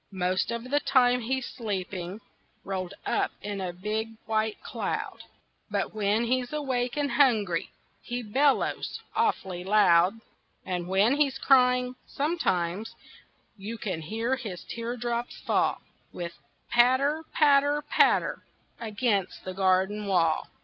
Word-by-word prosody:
Most 185 +1 0
of 235 +2 -4
the 290 - +4
time 250 -3 +3
he's 260 +2 -1
sleeping, 195 -3 -5 0.4
Rolled 190 -1 -4
up - - +1
in 205 -1 -5
a 185 -1 -2
big 215 +5 -3
white 220 -1 0
cloud, - - -3 0.5
But 200 -1 -2
when 215 +1 +1
he's 245 +1 0
awake 260 -4 -1
and 285 -2 0
hungry 220 - +2 0.3
He 245 0 -4
bellows 270 +6 +1 0.2
awfully 190 - 0
loud. 190 0 +4 0.5
And 180 -1 -3
when 200 +8 +3
he's 280 -3 +2
crying, 250 -2 +4
sometimes 215 - -1 0.6
You 210 +4 -6
can 185 -8 -3
hear 225 +10 -1
his 210 -8 -7
teardrops 235 0 -4
fall - - +1 0.3
With 170 -1 -5
a - - -31
patter, 260 +6 +4
patter, 290 0 +4
patter, 295 - +2 0.4
Against 215 -3 -1
the 185 - -4
garden 190 +2 +1
wall. 170 -5 +2
225 Hz, 125 wpm, -27 LUFS, 190-255 Hz, 0.6 s, the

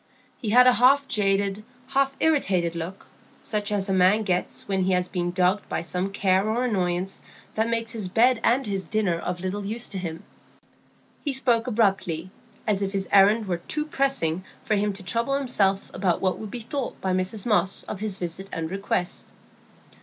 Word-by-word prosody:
He 220 - -3
had 250 +3 +7
a 255 - +7
half 270 +4 +4
jaded, 200 0 +1 0.3
half 275 0 +1
irritated 190 - +2
look, 170 +3 -6 0.3
such 210 -1 -2
as 200 -1 0
a 195 - 0
man 190 +4 +4
gets 180 -3 -2
when 190 -2 0
he 190 - +2
has 180 0 +1
been 175 -1 -2
dogged 185 +3 +1
by - - -2
some 180 +3 -2
care 195 +1 +2
or 235 +3 0
annoyance 185 -4 -1 0.3
that 220 +1 0
makes 230 -1 -1
his 220 -5 -3
bed 235 +5 +3
and 255 +3 +3
his 195 -2 -2
dinner 210 -4 0
of 180 +1 -4
little 190 +2 -3
use 220 +4 -2
to 195 - -4
him. 165 -3 -5 1.0
He 290 - 0
spoke 245 -3 +2
almost 250 - -2
abruptly, 190 -5 0 0.3
as 205 -2 +1
if 195 0 -2
his 195 -1 -1
errand 205 +3 +5
were 180 -3 -1
too 300 - -3
pressing 270 - 0 0.2
for 215 - 0
him 210 0 +1
to 195 0 -9
trouble 230 +9 0
himself 205 -8 +1
about 185 -3 +1
what 185 -1 0
would 215 - -6
be 240 +3 -6
thought 260 +3 -4
by 190 -1 -1
Mrs 185 +3 -1
Moss 210 -4 +1
of 205 - -6
his 210 -2 -2
visit 185 +2 -5
and 165 0 -4
request. 195 -2 -2
200 Hz, 190 wpm, -25 LUFS, 185-230 Hz, 1.0 s, had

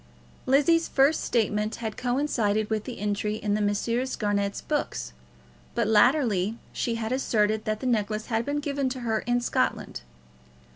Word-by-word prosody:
Lizzie's 310 +5 +4
first 280 +3 +3
statement 215 -1 0
had 220 -2 -5
coincided 235 -5 0
with 215 -1 -1
this 250 - -5
entry 210 +1 -1
in 210 -1 -1
the 210 - +1
Messrs. 230 +5 0
Garnett's 200 -1 -1
books; - - -3 0.6
but - - +1
latterly 220 -3 +3 0.2
she 235 - -1
had 225 0 -3
asserted 215 -4 +1
that 215 0 -2
the - - -4
necklace 215 -3 0
had 225 -1 0
been 290 +2 -2
given 280 -2 -1
to 255 0 -5
her 225 -2 0
in 245 0 +2
Scotland. - - -1
225 Hz, 155 wpm, -26 LUFS, 210-255 Hz, 0.6 s, Lizzie's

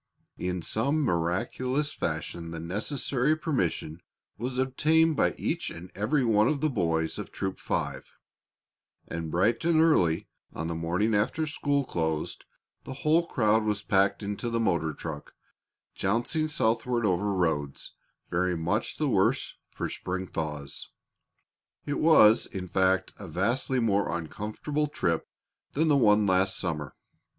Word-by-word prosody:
In 90 -1 -2
some 140 - 0
miraculous 125 - 0
fashion 85 -1 -3
the 85 0 -6
necessary 125 - 0
permission 90 - -2 0.3
was 125 +5 -4
obtained 155 +5 +3
by 90 - +2
each - - -1
and 85 +2 -9
every 125 +7 +1
one 110 -1 +4
of 150 0 +1
the 155 +1 +1
boys 80 -7 0
of - - -6
Troop 95 -1 -4
Five, - - -3 1.0
and 85 -1 -4
bright 100 +8 +1
and 165 -1 +3
early 100 - +3 0.3
on 80 - -4
the - - -2
morning 85 +7 0
after 120 +10 +1
school 145 -2 0
closed 80 -7 -2 0.4
the 135 - -7
whole 165 +3 +4
crowd 110 -5 +2
was 105 -2 -1
packed 100 +1 +2
into 105 +4 -3
the 115 0 0
motor 85 -7 +1
truck, 75 -1 -7 0.6
jouncing 120 - 0
southward 120 -4 0
over 100 +1 +1
roads 75 -6 -1 0.4
very 90 0 +1
much 90 +7 -1
the 155 - 0
worse 95 -7 +1 0.2
for - - -4
spring 95 +1 -4
thaws. 75 -5 -4 1.0
It 145 - -2
was, 115 -9 +6
in 95 -1 -6
fact, 95 +1 +1
a - - -8
vastly 115 - 0
more 100 -4 +1
uncomfortable 105 - -3
trip 85 - -1 0.5
than 160 +3 +2
the 145 - +5
one 105 -5 +5
last 95 0 +2
summer. 75 -6 -3
105 Hz, 140 wpm, -28 LUFS, 85-130 Hz, 1.0 s, was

